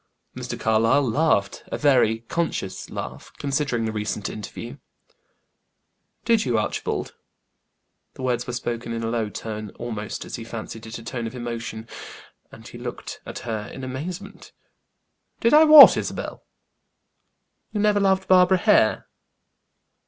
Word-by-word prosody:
Mr. - - -6
Carlyle 115 +5 +3
laughed; 115 -6 +1
a - - -4
very 125 -6 +3
conscious 115 - -3
laugh, - - -7
considering 135 -4 -1
the 110 - -1
recent 105 -1 -3
interview. 115 +5 -8 1.5
"Did 230 -2 +3
you, 120 -4 0
Archibald?" 110 - -2 1.0
The 130 - -8
words 125 -1 -1
were 120 - -4
spoken 120 -1 -4
in 115 0 -3
a 115 - -1
low 115 -3 -1
tone, 110 0 -6
almost, 110 -3 -5
or - - -11
he 115 - -5
fancied 115 0 -8
it, 110 - -6
a 115 - -11
tone 115 0 -4
of 115 - -8
emotion, 115 -2 -5 0.6
and - - -13
he - - -10
looked - - -7
at - - -6
her 110 -2 -3
in 135 - -8
amazement. 165 +10 -7 0.9
"Did 230 - +2
I 310 +1 +8
what, 305 -2 +11
Isabel?" - - -5 1.3
"You 210 - -3
never 205 0 +3
loved 190 -1 +2
Barbara 185 0 +5
Hare?" 180 - +3
120 Hz, 140 wpm, -24 LUFS, 110-160 Hz, 1.5 s, what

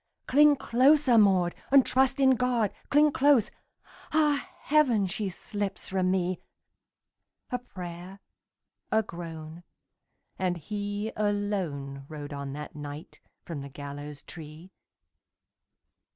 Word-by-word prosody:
"Cling 295 +2 +6
closer, 265 +1 +4
Maud, 185 -4 +4 0.2
and 275 -1 +6
trust 265 +1 +2
in 265 -1 +6
God! 245 -4 +1 0.2
Cling 295 +1 +5
close! 275 -5 +4 0.6
Ah, 300 -2 +2
heaven, 265 -9 +3
she 195 +2 -2
slips 205 +2 -5
from 185 -1 +1
me!" 185 -1 0 1.1
A 250 - -1
prayer, 180 -4 -9 0.7
a 220 0 +3
groan, 165 -2 -8 0.8
and 180 -2 0
he 205 +4 -4
alone 185 -10 -2
Rode 150 -2 -7
on 140 -1 -5
that 150 +2 -7
night 145 +2 -8 0.3
from 165 -5 -5
the 140 - -8
gallows 145 +1 -8
tree. 160 +3 -11
195 Hz, 110 wpm, -28 LUFS, 160-250 Hz, 1.1 s, Cling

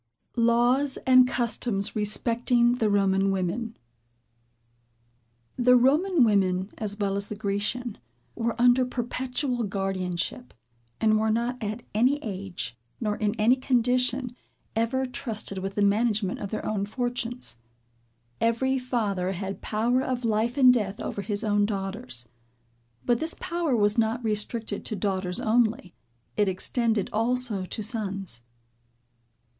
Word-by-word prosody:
LAWS 240 +4 +3
AND 255 -1 +7
CUSTOMS 225 -4 -1
RESPECTING 235 +3 +2
THE 220 - +2
ROMAN 195 -1 +2
WOMEN. 195 +5 -2 1.8
The 250 0 +5
Roman 295 +6 +4
women, 190 -3 +2
as 205 -2 -4
well 200 -2 0
as 200 0 -3
the 210 - -5
Grecian, 210 - -2 0.3
were 230 0 -2
under 245 +1 +5
perpetual 250 +1 -2
guardianship; 195 +1 -3 0.4
and 215 -1 +3
were 220 0 +1
not 235 +3 -1
at 215 +3 -4
any 250 +7 +3
age, 190 - -5 0.2
nor 210 -3 -1
in 210 +2 -1
any 230 +4 +5
condition, 250 0 +1 0.4
ever 235 +4 +1
trusted 220 -6 -4
with 195 +1 -4
the 205 - +2
management 205 -1 +1
of 200 - -5
their 215 - -4
own 200 -2 -1
fortunes. 245 - -3 0.8
Every 260 +4 +1
father 205 -7 -1
had 195 +1 -5
power 235 +4 +1
of 255 -2 -2
life 225 +3 0
and 255 -2 +7
death 210 -4 -1
over 200 - -4
his 205 +2 -2
own 205 -1 +2
daughters: 195 - -2 0.8
but 240 -1 +2
this 320 +1 -1
power 340 -6 -1
was 210 0 +3
not 230 +2 +1
restricted 215 0 -2
to 215 - -1
daughters 190 -3 -2
only; 220 -5 +1 0.4
it 205 -2 +3
extended 220 +2 0
also 230 -1 0
to 185 +4 -5
sons. 195 - -3
220 Hz, 130 wpm, -26 LUFS, 200-245 Hz, 1.8 s, AND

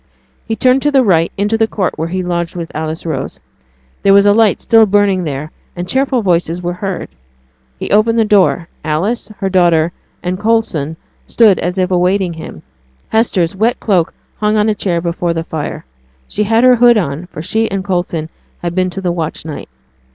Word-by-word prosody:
He 225 - -1
turned 255 +4 +3
to 295 - +2
the 270 -2 +4
right, 170 -6 +2
into 210 +3 0
the 225 - +3
court 200 -4 -2
where 160 +1 -3
he 185 +2 -3
lodged 170 -1 -2
with 170 -2 -5
Alice 160 +1 -4
Rose. 160 - -4 0.6
There 195 0 +5
was 200 0 +6
a 205 - +6
light 220 -1 +3
still 225 -1 +4
burning 195 -2 +2
there, 150 +1 -4 0.2
and 175 0 -5
cheerful 260 0 0
voices 175 -2 0
were 175 0 -3
heard. 185 0 -4 0.7
He - - -5
opened 220 +3 +3
the 225 - +3
door; 190 -4 +3 0.2
Alice, 165 +10 -1
her 195 - -2
daughter, 175 -3 +3 0.3
and 180 +1 -2
Coulson 190 -9 0 0.3
stood 215 -5 +4
as 180 +2 -2
if 185 0 0
awaiting 180 0 +1
him. 160 - -9 0.5
Hester's 195 -6 +1
wet 225 +5 +1
cloak 185 -6 +1 0.3
hung 215 0 +1
on 210 +1 +2
a - - +2
chair 175 -5 -1
before 170 0 -2
the 165 - -2
fire; 160 - -5 0.4
she 210 - -1
had 225 +3 +2
her 255 -1 +6
hood 240 0 +6
on, 165 -2 -2
for 155 - -8
she 220 +5 0
and 195 -2 -3
Coulson 175 -4 -2 0.4
had 175 -1 -2
been 185 0 +1
to 195 +2 -6
the 180 -2 0
watch 165 -2 -4
night. 155 - -7
185 Hz, 195 wpm, -15 LUFS, 170-215 Hz, 0.7 s, was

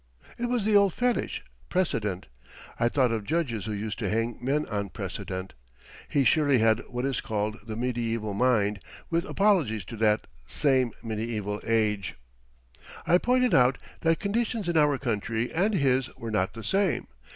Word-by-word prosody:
It 240 - 0
was 240 -4 0
the 215 -1 +3
old 200 -3 +5
fetich 245 0 0 0.3
precedent. 110 - -1 0.5
I 120 - +3
thought 130 -2 +2
of 110 -2 -1
judges 130 -6 -1
who 110 - -3
used 105 +1 -4
to 105 -5 -1
hang 115 +2 -1
men 145 +4 +1
on 100 -2 -3
precedent. 95 +2 -5 0.6
He 140 - +2
surely 145 -1 +4
had 110 -1 +4
what 125 +1 -3
is 135 -3 -1
called 105 0 -2
the 110 - -4
mediæval 115 -3 -2
mind, 105 -3 +2 0.3
with 170 +1 +1
apologies 160 - +2
to 115 +3 -8
that 105 0 +2 0.2
same 130 -4 +3
mediæval 110 -2 -3
age. 105 -3 +1 0.9
I 175 - +5
pointed 250 +1 +2
out 125 0 +5 0.2
that 165 -1 +2
conditions 220 0 -1
in 170 - 0
our 150 -3 +4
country 115 -1 -2
and 195 +6 +2
his 135 -5 +2
were 115 -1 -5
not 95 -3 0
the 115 - -8
same. 195 - +1
120 Hz, 160 wpm, -27 LUFS, 110-165 Hz, 0.9 s, old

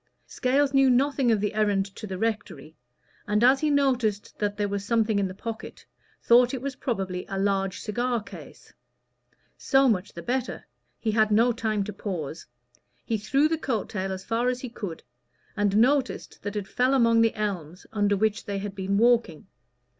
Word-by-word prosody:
Scales 275 +2 +1
knew 270 -1 +5
nothing 260 0 +2
of 220 - +2
the 210 +1 -1
errand 205 -2 +1
to 215 - -7
the 190 -1 -5
rectory; 205 -8 -3 0.5
and 210 +2 +1
as 260 +2 +6
he 310 - +1
noticed 250 -8 +1
that 205 -1 -1
there 205 -1 0
was 200 0 -3
something 220 -1 +1
in 195 - +1
the 185 - -8
pocket, 225 +2 -7 0.4
thought 245 +2 +5
it 250 - -6
was 275 -1 -3
probably 190 -8 -3
a 195 - -3
large 195 -1 0
cigar 240 +2 -1
case. - - -13 0.9
So 270 -1 +3
much 205 -5 0
the 170 - -8
better 255 0 -3 0.3
he 220 - -1
had 215 0 +3
no 230 +3 +4
time 220 -3 -1
to 210 +1 -6
pause. 170 -6 -5 0.6
He 225 -2 -1
threw 275 +8 +2
the 320 0 -1
coat 235 -9 -2
tail 190 -2 -3
as 190 0 -6
far 235 +2 0
as 250 0 -3
he 255 - -5
could, 200 -8 -7 0.5
and 205 -1 +1
noticed 260 +3 +1
that 205 0 -5
it 205 -2 -3
fell 255 +5 +1
among 230 -3 +4
the 225 -1 +2
elms 185 -5 -4
under 205 -1 +2
which 215 +1 0
they 200 -1 -3
had 200 0 -5
been 195 0 -1
walking. 230 -8 +2
215 Hz, 185 wpm, -26 LUFS, 200-245 Hz, 0.9 s, as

